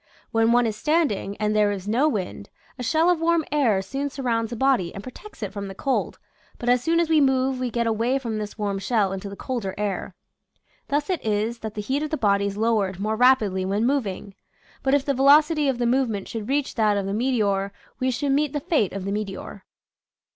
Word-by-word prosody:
When 225 0 +3
one 245 0 +4
is 220 -2 -1
standing, 285 - 0
and 210 0 0
there 210 -1 +3
is 200 -1 -5
no 255 +8 +3
wind, 200 -3 -4 0.3
a - - -4
shell 320 +7 +2
of 355 -2 +2
warm 335 -1 +2
air 235 -10 +2
soon 275 +8 -3
surrounds 235 -5 -1
the 240 - -5
body 240 -9 +2
and 195 - -7
protects 255 - -10
it 200 -1 -4
from 200 -1 -5
the 195 - -8
cold, 270 +6 -1 0.4
but 240 - -2
as 250 0 +4
soon 330 +4 +2
as 340 - +2
we 315 -1 +4
move 265 -1 +2
we 255 -1 -1
get 235 0 -1
away 230 +4 +1
from 230 -5 -3
this 210 0 -6
warm 200 -2 -2
shell 200 -2 +1
into 195 +1 -5
the 200 - -8
colder 210 -6 -4
air. 205 -1 -3 0.7
Thus 290 +5 0
it 360 - -2
is 220 +2 -1
that 220 -2 -6
the 210 - -3
heat 265 +7 -1
of 305 - -2
the 310 - -1
body 200 -3 +2
is 200 0 -5
lowered 210 -4 +1
more 215 +2 -1
rapidly 220 -6 +3
when 200 +4 0
moving. 215 -7 -1 0.5
But 270 +1 +2
if 285 -1 0
the 280 - +1
velocity 295 +3 +5
of 265 -3 +1
the 240 - 0
movement 235 -5 0
should 225 0 -6
reach 285 0 0
that 215 -3 +2
of 200 - -1
the 195 - -2
meteor 205 -5 0 0.3
we 255 - +1
should 275 +3 -1
meet 285 0 +1
the 295 - -1
fate 290 - 0
of 195 -1 -5
the 195 - -2
meteor. 200 -1 -5
230 Hz, 225 wpm, -24 LUFS, 205-275 Hz, 0.7 s, velocity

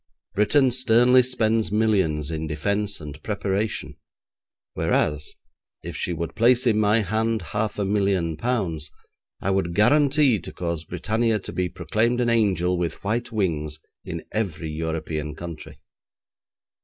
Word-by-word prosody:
Britain 130 +6 +3
sternly 125 0 +5
spends 115 -4 +1
millions 95 -9 +1
in 80 0 -3
defence 100 +7 -1
and 75 -1 -9
preparation, 105 0 -2 0.8
whereas, 75 0 0 0.5
if - - -6
she - - -2
would 85 -1 -3
place 120 +2 +3
in 110 -3 +3
my 110 +1 +4
hand 110 +1 0
half 105 0 -1
a 100 - 0
million 95 -5 +1
pounds 85 - -2 0.5
I 95 - 0
would 90 -3 0
guarantee 140 +1 +4
to - - -8
cause 85 -2 -4
Britannia 110 +5 0
to 100 - -7
be 90 -1 -1
proclaimed 110 +10 0
an 120 -1 +2
angel 90 -6 +2
with 85 -2 -3
white 115 +4 -1
wings 80 -8 -1 0.2
in - - -6
every 85 -7 -2
European 80 -1 -3
country. 85 -1 -8
100 Hz, 135 wpm, -24 LUFS, 85-115 Hz, 0.8 s, sternly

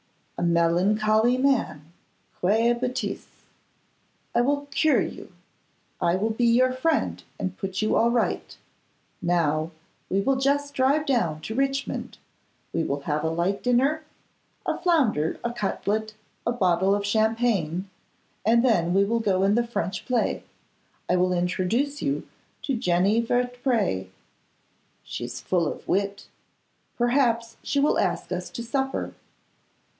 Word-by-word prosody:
'A - - -3
melancholy 210 +8 +3
man! 230 - 0 0.5
Quelle 225 +6 +3
bêtise! 250 +1 -3 1.1
I - - +3
will 285 +3 0
cure 310 -1 +3
you. - - -8 0.7
I 170 - +3
will 215 +4 0
be 235 +2 0
your 255 +2 +4
friend 305 +5 0 0.2
and 185 -1 -3
put 195 +2 -3
you 215 - +2
all 230 - +4
right. 235 0 -1 0.6
Now, 165 -3 +1 0.4
we 190 - +1
will 270 +5 +1
just 285 +2 +1
drive 280 +3 +2
down 175 - 0
to 220 - -5
Richmond; 275 +2 -2 0.6
we 165 - +1
will 140 -2 -2
have 150 +1 -2
a 160 - +1
light 175 +5 -1
dinner, 265 +6 +2 0.6
a - - 0
flounder, 255 - +1
a 235 - -2
cutlet, 215 0 -2 0.3
and 235 - +1
a - - -12
bottle 190 0 +3
of 205 0 -2
champagne, 215 -5 +1 0.6
and 235 +3 +4
then 175 -7 +2
we 195 - +5
will 230 +3 0
go 195 -3 +2
to 200 - +3
the 235 +1 +1
French 190 -5 -3
play. 250 -2 0 0.6
I 180 - +2
will 180 0 +2
introduce 185 +11 0
you 280 - -2 0.4
to 275 - -1
Jenny 195 +2 +2
Vertpré. 245 - 0 0.9
She - - -5
is - - -7
full 170 -4 +1
of - - -10
wit; 200 +1 -1 0.7
perhaps 240 -2 +1
she 285 - -1
will 285 - +3
ask - - -1
us - - -3
to 235 - -6
supper. 270 +3 -2
220 Hz, 140 wpm, -25 LUFS, 180-250 Hz, 1.1 s, we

